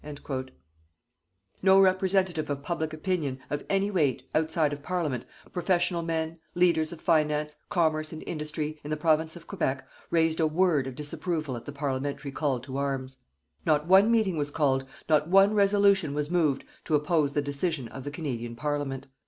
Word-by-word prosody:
_" 135 Hz, -3 st, -5 dB, 1.1 s
No 190 Hz, 0 st, +6 dB
representative 185 Hz, -3 st, +2 dB
of 140 Hz, -1 st, -3 dB
public 160 Hz, -1 st, -2 dB
opinion, 155 Hz, -4 st, -2 dB
of 145 Hz, -, -2 dB
any 195 Hz, +1 st, +1 dB
weight, 145 Hz, -9 st, +1 dB
outside 155 Hz, -1 st, +1 dB
of 145 Hz, -, -6 dB
Parliament, 150 Hz, -8 st, -2 dB, 0.3 s
professional 175 Hz, -1 st, +1 dB
men, 165 Hz, 0 st, -2 dB, 0.2 s
leaders 170 Hz, -3 st, +3 dB
of 170 Hz, -, -8 dB
finance, 150 Hz, -2 st, +1 dB
commerce 155 Hz, -5 st, +1 dB
and 160 Hz, -, -7 dB
industry, 155 Hz, -1 st, -4 dB
in 145 Hz, -, -7 dB
the 155 Hz, -, -1 dB
Province 160 Hz, +1 st, +1 dB
of 170 Hz, -, -11 dB
Quebec, 140 Hz, -9 st, -2 dB, 0.2 s
raised 165 Hz, -1 st, +2 dB
a 160 Hz, -, +4 dB
word 155 Hz, -4 st, +2 dB
of 130 Hz, -, -6 dB
disapproval 155 Hz, -1 st, -3 dB
at 115 Hz, -, -8 dB
the -, -, -6 dB
Parliamentary 140 Hz, 0 st, -3 dB
call 135 Hz, -2 st, 0 dB
to 130 Hz, +1 st, -6 dB
arms. 135 Hz, -1 st, -3 dB, 0.4 s
Not 150 Hz, -1 st, +2 dB
one 190 Hz, +5 st, +6 dB
meeting 215 Hz, -7 st, +2 dB
was 145 Hz, -1 st, -1 dB
called, 135 Hz, -3 st, +1 dB, 0.2 s
not 155 Hz, -1 st, +3 dB
one 195 Hz, +3 st, +6 dB
resolution 200 Hz, -6 st, +3 dB
was 150 Hz, +2 st, -2 dB
moved, 155 Hz, -6 st, +2 dB, 0.2 s
to 155 Hz, -, +2 dB
oppose 150 Hz, -1 st, +1 dB
the 145 Hz, -, +1 dB
decision 145 Hz, -1 st, -2 dB
of 135 Hz, +3 st, -9 dB
the 145 Hz, -, -4 dB
Canadian 125 Hz, -6 st, -4 dB
Parliament. 145 Hz, -1 st, -3 dB
155 Hz, 170 wpm, -28 LUFS, 145-175 Hz, 1.1 s, No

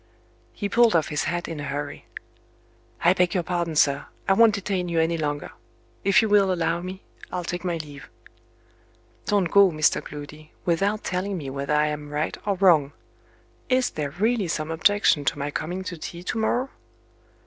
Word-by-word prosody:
He 205 Hz, -, -4 dB
pulled 230 Hz, 0 st, +4 dB
off 160 Hz, -3 st, +2 dB
his 150 Hz, -, -1 dB
hat 175 Hz, 0 st, -2 dB
in 165 Hz, -2 st, -5 dB
a -, -, -5 dB
hurry. 145 Hz, +1 st, -5 dB, 1.0 s
"I 175 Hz, -, +6 dB
beg 180 Hz, -1 st, +1 dB
your 180 Hz, -, +1 dB
pardon, 170 Hz, -2 st, -2 dB
sir; 140 Hz, -1 st, +2 dB, 0.2 s
I 195 Hz, -, +5 dB
won't 225 Hz, +1 st, +5 dB
detain 190 Hz, -3 st, -2 dB
you 165 Hz, -1 st, +1 dB
any 165 Hz, +1 st, +2 dB
longer. 145 Hz, -2 st, -3 dB, 0.5 s
If 200 Hz, +4 st, +5 dB
you -, -, +1 dB
will 205 Hz, -2 st, +4 dB
allow 170 Hz, -1 st, 0 dB
me, 185 Hz, +2 st, -7 dB, 0.3 s
I'll 180 Hz, -, -3 dB
take 175 Hz, +1 st, -4 dB
my 175 Hz, -2 st, -1 dB
leave." 145 Hz, -4 st, -9 dB, 1.2 s
"Don't 200 Hz, -5 st, +1 dB
go, 200 Hz, -1 st, +7 dB
Mr. 155 Hz, -3 st, +1 dB
Gloody, 150 Hz, +1 st, -10 dB
without 195 Hz, +5 st, +1 dB
telling 185 Hz, +1 st, -2 dB
me 140 Hz, -5 st, -5 dB
whether 140 Hz, +2 st, -1 dB
I 150 Hz, 0 st, +3 dB
am 150 Hz, -1 st, -5 dB
right 150 Hz, +1 st, -2 dB
or 200 Hz, -, +2 dB
wrong. 170 Hz, -7 st, +4 dB, 0.8 s
Is 255 Hz, -1 st, +2 dB
there 150 Hz, -2 st, -3 dB
really 210 Hz, -, 0 dB
some 155 Hz, -1 st, -2 dB
objection 165 Hz, -2 st, +3 dB
to -, -, 0 dB
my 145 Hz, +1 st, -3 dB
coming 180 Hz, +6 st, -4 dB
to 185 Hz, -1 st, -5 dB
tea 170 Hz, +2 st, -7 dB
tomorrow?" 240 Hz, +6 st, -1 dB
175 Hz, 180 wpm, -24 LUFS, 150-195 Hz, 1.2 s, go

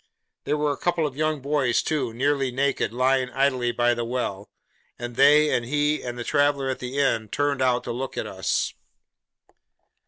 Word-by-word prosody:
There 150 Hz, -, 0 dB
were 150 Hz, 0 st, +1 dB
a 140 Hz, -, -4 dB
couple 175 Hz, -2 st, 0 dB
of 140 Hz, -3 st, -4 dB
young 155 Hz, -1 st, -1 dB
boys, 140 Hz, -3 st, +1 dB
too, 140 Hz, -7 st, -1 dB
nearly 135 Hz, +3 st, 0 dB
naked, 135 Hz, 0 st, 0 dB
lying 130 Hz, +1 st, +1 dB
idle 130 Hz, -1 st, +1 dB
by 120 Hz, 0 st, +2 dB
the 120 Hz, 0 st, -3 dB
well; 115 Hz, -5 st, -3 dB, 0.5 s
and 120 Hz, 0 st, -6 dB
they, 150 Hz, +3 st, +5 dB
and 120 Hz, -, 0 dB
he, 150 Hz, +4 st, 0 dB
and 120 Hz, -1 st, -6 dB
the 120 Hz, -, -4 dB
traveller 145 Hz, 0 st, +1 dB
at 130 Hz, -, -3 dB
the 125 Hz, +2 st, -5 dB
inn, 115 Hz, -6 st, +1 dB
turned 145 Hz, +1 st, 0 dB
out 125 Hz, -1 st, +2 dB
to -, -, -4 dB
look 130 Hz, +2 st, -5 dB
at -, -, -2 dB
us. -, -, -1 dB
135 Hz, 185 wpm, -24 LUFS, 120-145 Hz, 0.5 s, they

